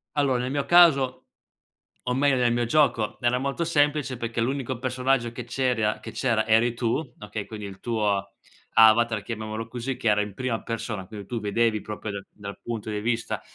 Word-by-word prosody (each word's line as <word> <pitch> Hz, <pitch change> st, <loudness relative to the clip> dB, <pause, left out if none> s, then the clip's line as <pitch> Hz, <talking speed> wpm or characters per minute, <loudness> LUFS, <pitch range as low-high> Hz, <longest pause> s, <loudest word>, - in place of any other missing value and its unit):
Allora, 135 Hz, -4 st, +2 dB
nel 130 Hz, +1 st, -3 dB
mio 140 Hz, -1 st, -1 dB
caso, 145 Hz, -7 st, +5 dB, 0.8 s
o 125 Hz, -, -1 dB
meglio, 140 Hz, 0 st, +3 dB
nel 120 Hz, -2 st, +2 dB
mio 120 Hz, 0 st, +1 dB
gioco, 120 Hz, -4 st, +2 dB
era 120 Hz, 0 st, +2 dB
molto 140 Hz, +5 st, -2 dB
semplice 145 Hz, -4 st, +1 dB
perché 115 Hz, 0 st, -3 dB
l'unico 130 Hz, 0 st, -2 dB
personaggio 130 Hz, -1 st, 0 dB
che 120 Hz, 0 st, -7 dB
c'eri 125 Hz, -2 st, 0 dB
a 105 Hz, -, 0 dB
che -, -, -8 dB
c'era 115 Hz, -5 st, 0 dB
eri 115 Hz, +2 st, +3 dB
tu, 115 Hz, -1 st, 0 dB, 0.2 s
okay. 105 Hz, 0 st, -5 dB
Quindi 105 Hz, -2 st, -7 dB
il 100 Hz, -1 st, -9 dB
tuo 100 Hz, -4 st, -1 dB, 0.4 s
avatar 110 Hz, -1 st, +5 dB
chiamiamolo 110 Hz, 0 st, -5 dB
così, 125 Hz, +2 st, -4 dB
che 120 Hz, -3 st, -1 dB
era 105 Hz, 0 st, +3 dB
in 105 Hz, -2 st, -6 dB
prima 125 Hz, -2 st, -2 dB
persona, 115 Hz, -4 st, -4 dB
quindi 100 Hz, -2 st, -9 dB
tu 120 Hz, +1 st, -3 dB
vedevi 110 Hz, +1 st, +1 dB
proprio 105 Hz, 0 st, -6 dB
da 100 Hz, -, -4 dB
dal 100 Hz, -1 st, -9 dB
punto 110 Hz, -2 st, -5 dB
di 105 Hz, -, -2 dB
vista 115 Hz, +1 st, -1 dB
115 Hz, 190 wpm, -25 LUFS, 110-130 Hz, 0.8 s, caso